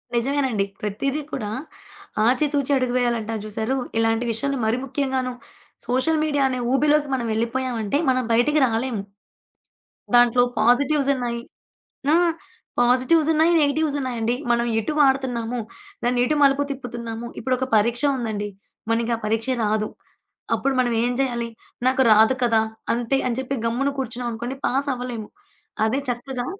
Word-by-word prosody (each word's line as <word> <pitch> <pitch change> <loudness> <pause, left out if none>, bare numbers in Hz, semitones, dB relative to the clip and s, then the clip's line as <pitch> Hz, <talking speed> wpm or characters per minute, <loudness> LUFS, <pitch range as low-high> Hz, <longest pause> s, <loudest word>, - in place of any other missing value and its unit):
నిజమేనండి. 250 -4 +1 0.2
ప్రతీది 270 +9 -2
కూడా 210 -5 -3 0.8
ఆచి 255 +5 +3
తూచి 285 -1 0
అడుగు 255 -1 0
వేయాలంటారు 225 -3 -1
జూసారు 220 +4 -2 0.2
ఇలాంటి 225 +1 +1
విషయంలో 275 +4 -2
మరీ 220 +2 +1
ముఖ్యంగాను 260 -2 -1 0.5
సోషల్ 260 +6 +1
మీడియా 290 -2 +1
అనే 255 -1 -2
ఊబిలోకి 295 +2 +3
మనం 240 -3 -2
ఎళ్ళిపోయామంటే 235 +1 -1
మనం 255 0 +2
బయటికి 295 +6 +3
రాలేము. 230 -1 -1 1.1
దాంట్లో 245 0 +6 0.2
పాజిటివ్స్ 275 +5 +3
ఉన్నాయి. 240 -2 -3 0.7
ఆ! - - +6 0.7
పాజిటివ్స్ 255 +6 +3
ఉన్నాయి, 320 +2 +4
నెగెటివ్స్ 290 0 +1
ఉన్నాయండి. 240 -2 -1 0.2
మనం 235 0 +2
ఎటు 225 +8 -2
వాడుతున్నాము. 250 -4 +1 0.4
దాన్ని 245 +1 +1
ఎటు 300 - +1
మలుపు 275 0 +4
తిప్పుతున్నాము. 235 -3 -6
ఇప్పుడొక 255 +2 0
పరీక్ష 235 +5 +1
ఉందండి, 215 -4 -3 0.4
మనకి 230 +1 +1
ఆ - - -6
పరీక్ష 225 +3 -1 0.2
రాదు. 215 0 +1 0.7
అప్పుడు 275 0 0
మనం 245 -2 +2
ఏం 245 - +1
జేయాలి? 240 -3 -1 0.4
నాకు 260 +1 +3
రాదు 220 +4 +6
కదా! 230 -2 +3 0.3
అంతే 240 +3 0
అని 245 0 -1
చెప్పి 265 +1 -2
గమ్మున 250 +5 0
కూర్చున్నాం 245 -1 -3
అనుకోండి, 240 +3 -4
పాస్ 275 +3 0
అవ్వలేము. 245 -4 -5 0.6
అదే 255 +5 +1
చక్కగా 245 +1 -3
245 Hz, 135 wpm, -23 LUFS, 230-270 Hz, 1.1 s, దాంట్లో